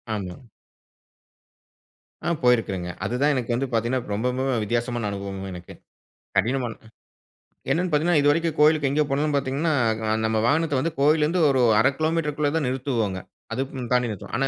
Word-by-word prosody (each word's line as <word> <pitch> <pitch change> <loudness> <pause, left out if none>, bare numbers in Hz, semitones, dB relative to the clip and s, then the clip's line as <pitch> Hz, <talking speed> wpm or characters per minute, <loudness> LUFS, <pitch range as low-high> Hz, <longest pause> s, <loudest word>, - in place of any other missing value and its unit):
ஆமா. 90 -4 -5 1.9
ஆ - - +2
போயிருக்கிறேன்ங்க. 100 -8 +1
அது - - -2
தான் 145 +1 +4
எனக்கு 120 -2 -1
வந்து 135 +3 -1
பாத்தீங்கன்னா, 120 +3 0
ரொம்ப, 110 +4 -2
ரொம்பவே 130 0 -1
வித்தியாசமான 120 +1 -1
அனுபவம் 100 -1 -5
எனக்கு. 90 0 -10 0.6
கடினமானதுங்க. 115 +1 -1 0.8
என்னனு 180 +2 +1
பாத்தீங்கன்னா 155 +1 +3
இது 145 - +3
வரைக்கும் 165 +1 +1
கோயிலுக்கு 150 -1 +4
எங்க 150 +2 +2
போனாலும் 145 +2 0
பாத்தீங்கன்னா, 140 +4 0 0.5
நம்ம 110 0 +1
வாகனத்த 145 0 +1
வந்து 165 +4 -1
கோயில்ல 150 +2 +4
இருந்து 170 +3 +1
ஒரு 135 -1 +2 0.2
1/2 - - +4
கிலோ 155 0 +1
மீட்டருக்கு 150 -2 -2
உள்ள 145 - +3
தான் 155 -5 0
நிறுத்துவோங்க, 125 -7 -1 0.4
அதுக்கும் 130 -1 -4
தாண்டி 125 -1 +2
நிறுத்த 105 -4 -7
மாட்டோம். - - -4
130 Hz, 155 wpm, -24 LUFS, 115-150 Hz, 1.9 s, தான்